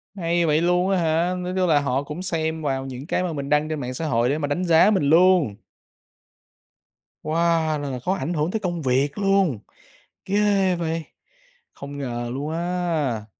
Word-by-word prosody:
Hay 170 -2 0
vậy 155 0 +2
luôn 180 +2 +2
á 195 - +2
hả? 170 +1 +1
Nói 180 0 -4
chung 185 -1 +2
là 150 -2 +5
họ 140 -1 -1
cũng 150 +4 -7
xem 160 -3 -2
vào 135 -3 -2
những 130 +1 -7
cái 180 - 0
mà 175 -2 -2
mình 140 -2 -5
đăng 150 +1 +2
trên 155 -1 -3
mạng 125 -2 -4
xã 160 +6 -4
hội 120 -2 +1
để 145 - 0
mà 145 -2 -2
đánh 145 +6 -1
giá 170 +4 +5
mình 195 -7 +1
luôn! 170 - +4 1.7
Wow! 155 - -3 0.4
Là 145 -1 -4
là 130 -2 -4
khó 180 +10 -1
ảnh 180 -3 -3
hưởng 155 +1 -1
tới 220 - -1
công 175 -4 -3
việc 135 +1 0
luôn. 195 - +2 0.7
Ghê 200 -2 +2
vậy! 165 -1 -2 0.7
Không 140 0 -9
ngờ 120 -3 -4
luôn 140 +3 -4
á. 165 -9 -2
160 Hz, 195 wpm, -23 LUFS, 140-180 Hz, 1.7 s, là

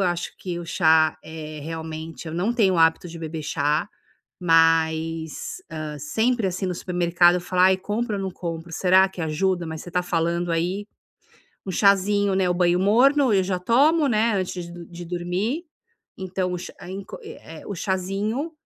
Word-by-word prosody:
acho 175 0 -4
que 175 -2 -5
o 170 - -7
chá, 160 -2 +3
eh, 155 -1 -8
realmente, 160 +1 -6
eu 160 - -5
não 190 +7 0
tenho 205 -6 +3
o - - 0
hábito 165 +2 +3
de 170 - -9
beber 160 -1 -5
chá, 150 0 0 0.5
mas, 165 - +1
hã, 155 -1 -5
sempre, 225 - 0
assim, 185 +1 -3
no 180 - -2
supermercado 175 0 +3
eu - - -2
falo: 180 +1 0
"Ai, 190 0 +6
compro 210 +3 -2
ou - - -3
não 190 - -3
compro? 170 -1 -6
Será 190 +2 +4
que 190 - -10
ajuda?". 175 +3 0
Mas 160 0 -6
você 175 - -10
tá 180 +1 0
falando 170 0 -1
aí, 180 +5 -1 0.8
um - - -3
chazinho, 200 +1 +3
né, 190 -1 +2
o 180 - +1
banho 175 0 +2
morno 255 +7 +4
eu 195 -2 +4
já 185 -1 -1
tomo, 285 - +3
né, 225 0 +2
antes 180 -2 -4
do 170 -1 -10
de 175 0 -9
dormir. 180 - -2 0.5
Então, 185 -1 -2
o 180 - -2
ch - - -7
é, 175 - -10
em 195 +1 -6
co - - -9
é 445 +3 -11
é, - - -14
o 200 - -4
chazinho. 195 - -2
180 Hz, 190 wpm, -24 LUFS, 165-195 Hz, 0.8 s, Ai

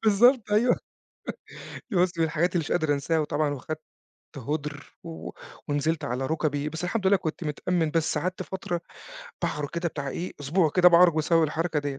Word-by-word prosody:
بالضبط، 225 +2 +5
أيوه. 235 +4 +4 1.2
دي - - -2
بُص، 180 -1 +2
من 165 - +4
الحاجات 160 +3 0
اللي 175 - +4
مش - - -6
قادر 160 -4 +2
أنساها، 145 +3 0
وطبعًا 150 -1 0
وخدت 155 +4 -6 0.6
هُدْر، 145 +2 -5
و 165 -1 -7 0.4
ونزلت 150 +2 0
على 130 +1 -2
ركبي، 150 -1 -1
بس 160 +3 -5
الحمد 195 +2 -1
لله 200 +1 +6
كنت 165 -1 -4
متأمّن 160 +2 0
بس 160 -1 +1
قعدت 185 +4 -2
فترة 175 -2 -4 0.6
باعرج 150 -1 -1
كده 170 0 -1
بتاع 140 -3 -5
إيه، 175 +6 -4
أسبوع 155 +3 +2
كده 180 +3 +6
باعرج 175 -1 +6
بسبب 165 +1 +3
الحركة 160 +1 -1
ديّة. 140 -2 -4
160 Hz, 175 wpm, -26 LUFS, 150-180 Hz, 1.2 s, لله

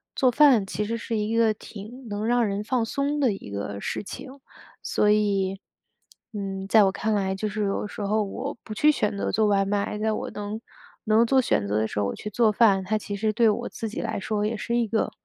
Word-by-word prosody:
做 260 - +4
饭 250 -5 +5
其 195 +3 -2
实 230 +2 -2
是 230 0 -3
一 215 +2 -1
个 225 -2 +4
挺 225 +4 -10
能 205 +1 -3
让 240 0 +3
人 200 -1 -2
放 240 +2 0
松 280 +5 -1
的 255 -5 +3
一 195 - -7
个 100 0 -4
事 - - -3
情。 260 +6 -8 0.5
所 210 - +2
以， 195 -2 +1 0.7
嗯， 195 -2 -4
在 215 +1 +6
我 195 - +3
看 220 +3 -1
来 195 -2 0
就 215 +3 -2
是 210 0 -2
有 195 - -1
的 - - -4
时 210 - -8
候 210 +2 +1
我 250 +8 -5
不 215 - -7
去 300 +8 +4
选 210 -7 -1
择 200 - -2
做 220 +2 +2
外 200 -1 +3
卖， 200 +1 -1
在 220 +1 +1
我 215 - -3
能 210 +1 -5 0.5
能 220 +1 +4
做 265 +3 +3
选 100 - 0
择 105 +1 0
的 110 +1 +1
时 105 - -4
候 100 - +1
我 - - -3
去 210 - -6
做 225 +1 +3
饭， 205 -3 +4
它 215 +4 0
其 205 -1 -5
实 215 +2 0
对 230 +2 +3
我 240 +3 -1
自 225 - -5
己 215 - -4
来 225 - -3
说 210 +1 -2
也 215 +2 -1
是 235 +2 -2
一 240 -1 +1
个， 220 +1 0
210 Hz, 260 characters per minute, -25 LUFS, 200-230 Hz, 0.7 s, 在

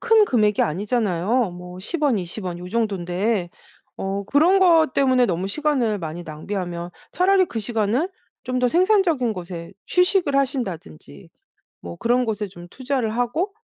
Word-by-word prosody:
큰 450 -2 +5
금액이 210 - +2
아니잖아요. 205 +4 0
뭐 180 +1 -10
10 310 - -4
원 280 -6 +3
20 180 +3 -6
원 175 -1 -4
요 180 +1 -8
정돈데 195 -2 -1 0.5
어 195 +1 -3
그런 325 - +4
것 330 -6 +5
때문에 255 -3 +3
너무 185 +1 -2
시간을 255 -5 0
많이 165 0 -6
낭비하면 175 +2 -5 0.2
차라리 375 +1 +4
그 230 -10 -5
시간을 225 - 0 0.4
좀 255 0 -1
더 250 -1 +2
생산적인 345 - +2
곳에 175 -2 -7 0.2
휴식을 360 -5 +2
하신다든지 180 - -3 0.5
뭐 85 0 -8
그런 245 +2 +1
곳에 210 -2 -2
좀 175 -1 -12
투자를 260 -1 -2
하고 315 - -1
225 Hz, 300 characters per minute, -22 LUFS, 180-275 Hz, 0.5 s, 큰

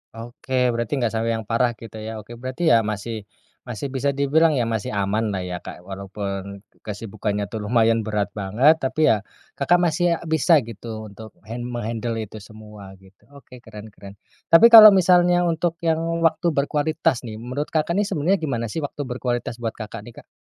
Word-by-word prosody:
Oke, 125 +2 -2
berarti 115 0 -3
nggak 120 -5 0
sampai 115 0 -1
yang 110 - -5
parah 120 +2 0
gitu 110 0 -11
ya. 110 +1 -6
Oke 115 +3 -12
berarti 130 +7 -1
ya 115 - +6
masih 105 0 -5 0.4
masih 125 +3 -5
bisa 140 +1 -1
dibilang 150 +3 +3
ya 125 - +1
masih 115 -2 -3
aman 100 +3 0
lah 95 -3 -3
ya, 90 -1 -5
Kak, 90 - -11
walaupun 100 +1 -6 0.2
kesibukannya 105 -1 -4
tuh 110 - -4
lumayan 115 0 +3
berat 105 -2 -2
banget, 110 +11 +2
tapi 155 +3 +2
ya, 110 - +2 0.4
Kakak, 145 +5 +3
masih 175 0 +1
a - - -10
bisa 160 +1 +3
gitu 110 -1 -8
untuk 110 +1 -12
hand 120 +4 -6
menghandle 115 -1 -4
itu 110 +1 -10
semua 105 -2 -13
gitu. 95 +1 -23
Oke 130 -2 -14
keren 110 -2 -12
keren. 100 -1 -13 0.3
Tapi 225 +8 +7
kalau 215 -3 +11
misalnya 180 -1 +4
untuk 170 0 0
yang 160 -1 +1 0.2
waktu 165 +1 +2
berkualitas 145 -3 0
nih, 110 - -7
menurut, 125 +6 -5
Kakak, 155 +1 -1
nih 205 - 0
sebenarnya 185 +1 0
gimana 120 -8 -3
sih - - -3
waktu 145 -1 -5
berkualitas 125 -2 -4
buat, 115 -2 -4
Kakak, 110 +1 -7
nih, 120 - -12
Kak? - - -48
115 Hz, 185 wpm, -22 LUFS, 105-145 Hz, 0.4 s, kalau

